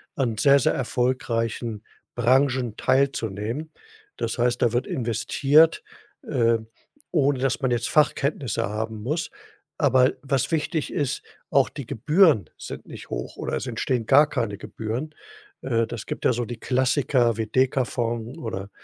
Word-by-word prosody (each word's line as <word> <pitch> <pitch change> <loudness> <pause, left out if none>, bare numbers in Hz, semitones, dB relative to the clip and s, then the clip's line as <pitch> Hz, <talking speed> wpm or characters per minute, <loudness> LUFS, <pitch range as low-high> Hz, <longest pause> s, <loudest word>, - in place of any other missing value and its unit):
an 120 -5 -1
sehr, 140 +3 +5
sehr - - +2
erfolgreichen 120 -3 -1 0.3
Branchen 125 -1 +2
teilzunehmen. 130 +1 0 0.5
Das - - -3
heißt, 120 0 +1
da 120 - +3
wird 120 +2 0
investiert, 145 - +2 0.4
äh, 115 -4 +2 0.5
ohne 145 -5 +2
dass 130 0 0
man 130 -2 +1
jetzt 120 0 0
Fachkenntnisse 145 -4 +1
haben 110 +1 -4
muss. 155 +9 -2 0.5
Aber 130 -3 +4
was 135 -2 -1
wichtig 160 -1 -1
ist, 140 -2 -1 0.3
auch 135 -1 +3
die 140 -6 -8
Gebühren 150 - +3
sind - - -8
nicht - - -11
hoch - - -5
oder - - -3
es - - -3
entstehen 125 -3 -1
gar 145 +5 +6
keine 105 -7 -2
Gebühren. 120 +8 -5 0.5
Äh, 115 -3 0
das 115 -2 -6
gibt - - -5
ja - - +4
so 120 +1 -2
die 120 0 -7
Klassiker 125 -2 +1
wie 110 - -2
Dekafond 125 0 0
oder 100 -7 -5
125 Hz, 145 wpm, -24 LUFS, 115-140 Hz, 0.5 s, gar